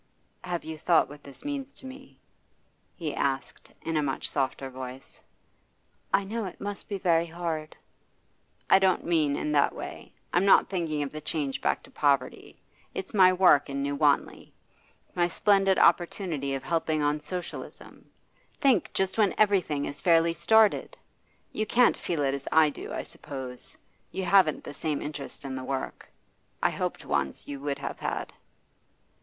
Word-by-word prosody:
'Have 175 -2 -3
you 160 -1 -7
thought 170 +1 +3
what 145 0 -12
this 140 - -10
means 280 -1 -4
to - - -9
me?' 265 +1 -11 0.8
he 160 -4 -4
asked, 135 -2 -3
in 165 - -2
a 155 - +3
much 135 -2 -2
softer 135 -1 -1
voice. 130 0 -9 0.9
'I 200 - +3
know 220 +2 -3
it 185 - -8
must 205 0 -4
be 200 - -2
very 170 -3 +2
hard.' 160 -2 -4 0.9
'I 190 - +8
don't 190 -1 +2
mean 155 -4 +2
in 150 - -2
that 145 -1 +3
way. - - -8 0.2
I'm 175 - +3
not 195 - +5
thinking 160 -5 -1
of 140 - -5
the 155 - -7
change 145 -3 -2
back - - 0
to - - -16
poverty. 140 -3 0 0.4
It's 190 - -5
my 185 -3 +7
work 180 -6 +5
in 140 0 -2
New 140 0 -1
Wanley; 145 -1 +1 0.6
my 175 -1 +2
splendid 195 +1 +3
opportunity 165 -6 +2
of 135 - -5
helping 160 -2 0
on 145 +1 +1
Socialism. 175 +4 -8 0.5
Think, 260 - +3
just 190 +3 0
when 205 -3 +3
everything 185 -9 +2
is 140 - -6
fairly 165 -1 +4
started! 215 +6 +3 0.5
You 215 0 -2
can't 245 +2 +4
feel 160 -4 -2
it 135 -1 +1
as 140 -1 -5
I 155 -1 +5
do, - - -8
I - - -3
suppose. 130 -3 -8 0.3
You 190 - -3
haven't 185 -7 +4
the - - -8
same 150 0 -2
interest 145 -1 -7
in 135 - -4
the 130 0 -5
work. 130 0 -5 0.5
I - - +2
hoped - - -3
once 65 - -1
you 140 -1 -6
would 140 0 -2
have - - -6
had. - - -3
160 Hz, 165 wpm, -28 LUFS, 140-190 Hz, 0.9 s, I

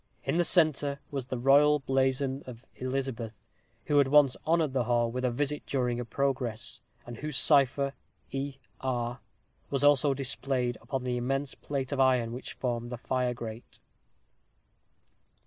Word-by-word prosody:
In - - 0
the 175 - +4
centre 150 -5 +2
was 135 -3 -4
the 130 - -3
royal 140 +4 +5
blazon 135 0 0
of 120 0 -10
Elizabeth, 130 -4 -3 0.5
who 145 -1 +3
had 140 - +4
once 140 -2 +5
honored 160 -4 +2
the 130 -3 +1
hall 120 0 +1
with 125 +2 -3
a 125 - +2
visit 145 +4 -2
during 125 -3 0
a 120 - -3
progress, 125 -3 -1 0.2
and 120 -1 -8
whose 150 0 -3
cipher 140 -1 +4 0.4
E. 135 0 -3 0.2
R. 120 -1 -2 0.5
was 140 0 -1
also 145 -1 +4
displayed 130 -2 -1
upon 130 +2 -4
the 125 -1 -1
immense 135 +3 -1
plate 135 -2 -4
of 140 - -2
iron 125 -3 +3
which 125 - -6
formed 120 -2 -3
the 125 - -5
fire 125 0 -1
grate. 115 0 -8
130 Hz, 155 wpm, -29 LUFS, 120-140 Hz, 0.5 s, royal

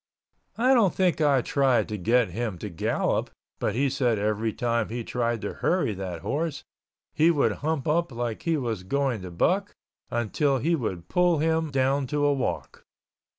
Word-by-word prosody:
I 255 +4 +4
don't 220 -8 +3
think 180 -4 +1
I 140 -4 +3
tried 135 -4 +2
to 105 - -3
get 115 +3 +2
him 105 0 -3
to 105 - -6
gallop 80 - -1 0.3
but - - -1
he 140 +3 +2
said 125 -4 +1
every 105 +2 0
time 115 -1 -1
he 120 +1 -4
tried 120 -1 -1
to 100 - -4
hurry 175 - +1
that 90 -4 -5
horse 145 - -2 0.5
he 160 +2 +4
would 145 -9 +3
hump 155 -2 -1
up 170 +1 +1
like 120 -2 -3
he 165 -2 0
was 115 -8 -3
going 130 +2 -1
to 90 - -7
buck 195 - 0 0.4
until 135 +4 0
he 160 +7 0
would 95 - -3
pull 175 - +3
him 160 +1 +1
down 135 0 +1
to 145 +2 0
a 145 - +4
walk. 135 - -3
130 Hz, 180 wpm, -26 LUFS, 110-155 Hz, 0.5 s, I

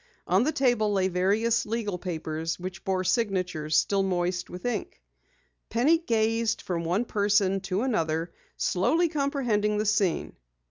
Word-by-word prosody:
On 185 +5 +3
the 305 - +1
table 245 -7 +2
lay 190 -2 +1
various 215 +6 +1
legal 210 -4 -3
papers 160 -2 -3
which 180 0 -7
bore 185 -1 0
signatures 180 -8 0
still 200 -1 +2
moist 180 -1 -1
with 180 +4 -9
ink. 225 - -3 0.7
Penny 280 +9 +3
gazed 225 -5 0
from 170 -2 -3
one 180 +8 0
person 205 -2 +2
to 190 +3 -2
another, 165 -9 -1 0.2
slowly 325 - +2
comprehending 255 -9 0
the 210 - 0
scene. 200 -4 0
200 Hz, 140 wpm, -27 LUFS, 180-230 Hz, 0.7 s, On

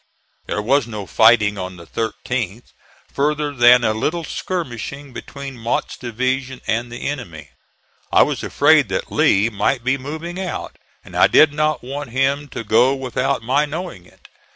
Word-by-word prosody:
There 105 - -2
was 135 +2 +2
no 105 -3 -6
fighting 105 -1 +4
on 95 0 -6
the 85 - -12
13th, 115 0 -4 0.4
further 150 +1 0
than 120 -1 +6
a 110 - +2
little 160 +10 -2
skirmishing 140 -5 -5
between 135 0 -8
Mott's 115 +1 -2
division 130 +2 -2
and 120 +2 -1
the 120 - -5
enemy. 85 - -6 0.6
I - - +6
was - - -2
afraid - - +3
that - - -3
Lee 105 +4 +3
might 115 +4 0
be 130 +2 +1
moving 160 +6 -6
out, 185 -3 -5 0.3
and - - -12
I - - +6
did 155 -2 +5
not 155 -1 0
want 140 +1 -6
him 135 +3 0
to 115 -3 -6
go 120 +5 +3
without 130 -3 -2
my 135 +5 +2
knowing 150 - -6
it. - - -21
130 Hz, 160 wpm, -20 LUFS, 115-145 Hz, 0.6 s, than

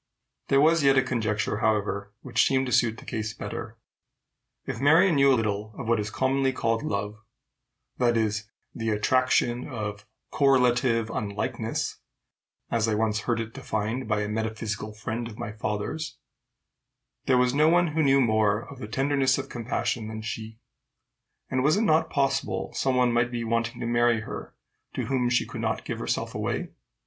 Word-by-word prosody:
There 135 - +4
was 160 +3 +5
yet 135 -1 +5
a 130 - +5
conjecture, 110 -4 -1
however, 100 -2 0
which - - +2
seemed 135 -1 +2
to 125 - -4
suit 115 -1 +3
the - - -12
case 110 -2 -4
better. - - -6 0.9
If - - -4
Marion 165 +6 +5
knew 140 -1 +5
little 110 -3 -1
of 125 - -6
what 115 -1 +2
is 105 0 -2
commonly 130 +4 +1
called 115 -3 0
love, 105 +1 -3 0.8
that 120 -2 +3
is, 105 -1 -1 0.2
"the 115 -1 -3
attraction 120 +2 +2
of 105 -4 -5 0.2
correlative 125 -4 +3
unlikeness," 100 -2 -3 0.7
as 115 -1 +1
I 110 - +1
once 110 0 +1
heard 120 -1 +2
it 115 0 -5
defined 110 +4 -3
by 105 -1 +1
a 105 - -2
metaphysical 110 0 -3
friend 115 +2 -4
of 110 -2 -10
my 105 - -5
father's, 105 +8 -4 1.1
there 130 - +4
was 125 0 +3
no 150 +3 +4
one 175 0 +4
who 155 +1 0
knew 135 -2 +4
more 110 -3 +3
of 140 - -11
the 105 - -6
tenderness 135 +2 +2
of - - -5
compassion 115 -1 -2
than 110 0 -6
she; 110 0 -6 0.9
and 130 0 0
was 155 +6 +4
it 220 - +2
not 160 -6 +3
possible 135 -9 -1
some 130 -1 0
one 125 -1 +3
might 120 0 +2
be 120 -1 -3
wanting 115 +1 -1
to - - -3
marry 120 -1 +2
her - - -8 0.4
to - - -2
whom 125 -3 +1
she 125 - +2
could - - -7
not - - -2
give - - -4
herself - - -2
away? - - -2
115 Hz, 175 wpm, -26 LUFS, 110-130 Hz, 1.1 s, was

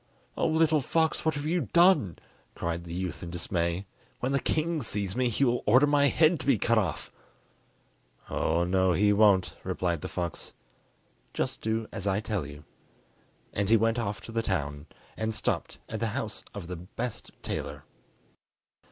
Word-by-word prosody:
"Oh, - - +1
little 160 -1 +3
fox, 160 +4 +1
what 160 -1 +1
have 145 0 -4
you 170 +3 +1
done?" 170 - +5 0.4
cried 85 0 -3
the 85 - -7
youth 90 0 -3
in 85 - -6
dismay; 85 +1 -1 0.3
"when 125 - -1
the 140 - +2
king 160 +2 0
sees 105 -4 -2
me 125 -1 +2
he 130 +5 +2
will 120 -1 +1
order 130 +7 +6
my 145 -1 +4
head 155 +2 +4
to 130 - -7
be 135 -5 +5
cut 115 +3 +3
off." 80 -9 -3 1.2
"Oh, 85 +2 +1
no, 95 +1 +2
he 105 +4 +4
won't!" 100 -4 +4
replied 85 -4 -1
the - - -4
fox; 85 -3 -4 0.8
"just - - -2
do 110 0 -1
as 95 - -5
I 95 +1 +2
tell 105 -8 -2
you." 75 0 -11 0.9
And 100 -1 0
he 115 - +7
went 115 +2 +1
off 105 -4 -3
to - - -9
the 115 0 0
town, 75 -8 -2 0.3
and 110 0 -2
stopped 105 - -2
at - - -4
the - - 0
house - - -4
of 100 -4 -6
the 90 0 -5
best 110 +7 -6
tailor. - - -4
105 Hz, 175 wpm, -28 LUFS, 90-130 Hz, 1.2 s, he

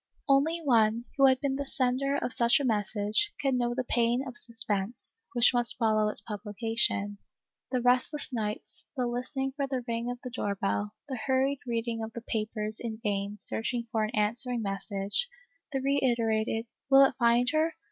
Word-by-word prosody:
Only 300 +5 +3
one, 230 -3 +3
who 275 -1 +6
has 260 -1 +5
been 270 0 -1
the 280 - -3
sender 265 +1 0
of 255 - -1
such 235 +4 +4
a - - -2
message, 215 - 0
can 270 -2 +1
know 240 -1 0
the 255 - -1
pain 240 +2 +1
of 250 - -7
suspense, 225 - -3
which 240 +1 +5
must 240 0 +4
follow 215 -2 +2
its 210 - +5
publication. 205 -1 -1 0.5
The 250 -2 0
restless 255 +3 +1
nights, 215 -1 -4
the 250 - +1
listening 255 +3 -2
fot 275 0 -3
the 260 -2 -2
ring 235 +1 -2
of 245 - -3
the 250 - -6
door 205 -5 -2
bell, 100 - -2
the 260 -4 -4
hurried 265 +1 +2
reading 230 -1 -2
of 220 0 -6
the 235 - -6
papers 215 -1 -2
in 220 -2 -5
vain 200 -1 -2
search 225 +4 -3 0.2
for 220 -1 +1
an 215 +2 -3
answering 230 +3 0
message, 195 - -1 0.4
the 270 - -1
reiterated, 230 -5 +1
" - - -61
will 270 0 +8
it - - +1
find 240 +1 +3
her 315 +1 +1
235 Hz, 180 wpm, -29 LUFS, 215-265 Hz, 0.5 s, will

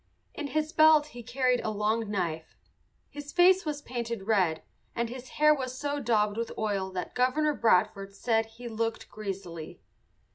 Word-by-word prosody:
In 295 - -4
his 310 +3 -2
belt 310 -2 +6
he 240 - -8
carried 250 +1 +1
a - - -1
long 215 +1 0
knife. 170 -6 -3 0.5
His 290 0 -8
face 370 +1 +5
was 290 -1 -3
painted 235 -4 -4
red, 190 -7 +1 0.3
and 235 -1 -1
his 255 +1 -8
hair 305 0 +6
was 260 -3 -4
so 290 +1 -2
daubed 215 -4 +1
with 230 0 -2
oil 200 -3 -1
that 180 -1 -4
Governor 295 +5 +2
Bradford 200 -4 +1
said 225 +1 +1
he 230 +2 -10
"looked 225 0 -3
greasily." 190 -6 -6
230 Hz, 160 wpm, -29 LUFS, 205-285 Hz, 0.5 s, belt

